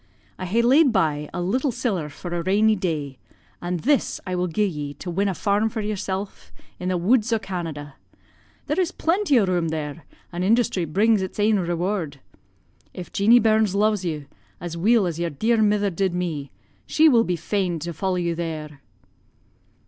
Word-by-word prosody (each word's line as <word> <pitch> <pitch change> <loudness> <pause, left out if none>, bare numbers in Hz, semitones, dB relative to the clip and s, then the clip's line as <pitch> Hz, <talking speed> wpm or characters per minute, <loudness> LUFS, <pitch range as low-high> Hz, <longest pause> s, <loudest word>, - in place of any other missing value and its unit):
I 185 - -4
ha'e 230 +6 +2
laid 270 +3 +5
by 150 -7 0
a - - -4
little 255 +9 0
siller 190 - -2
for 175 +4 -7
a 175 - -1
rainy 210 +5 +3
day, 150 -8 -3 0.4
an' 175 +1 -2
this 275 - +1
I 185 - -3
will 180 0 0
gi'e 210 +5 +1
ye 150 -6 -4
to 175 - -6
win 195 +4 0
a 190 - -1
farm 205 +5 +1
for 225 - -5
yersel' 205 -2 -2 0.5
in 180 - -2
the 185 - +1
woods 220 +6 +2
o' 225 - +3
Canada. 165 -8 -6 0.7
There - - -1
is 365 -1 +1
plenty 335 - +2
o' 205 - +3
room 175 -3 0
there, 155 0 -5 0.3
an' 175 0 -4
industry 200 -3 +2
brings 205 +6 +2
its 190 +2 -5
ain 210 0 +3
reward. 175 -3 -2 0.8
If 180 - -8
Jeanie 220 +4 +5
Burns 220 -3 +3
lo'es 210 -1 +2
you, 155 -4 -3 0.3
as 175 -1 -6
weel 210 +5 +3
as 170 -2 -3
yer 170 0 -1
dear 220 +10 +1
mither 205 -1 +2
did 185 +1 -1
me, 160 -6 -3 0.4
she 315 +1 +4
will 240 -6 +5
be 180 -5 -1
fain 180 +1 -1
to 170 +2 -4
follow 190 +3 -1
you 170 -1 -1
there.' 155 -4 -5
185 Hz, 185 wpm, -23 LUFS, 170-215 Hz, 0.8 s, laid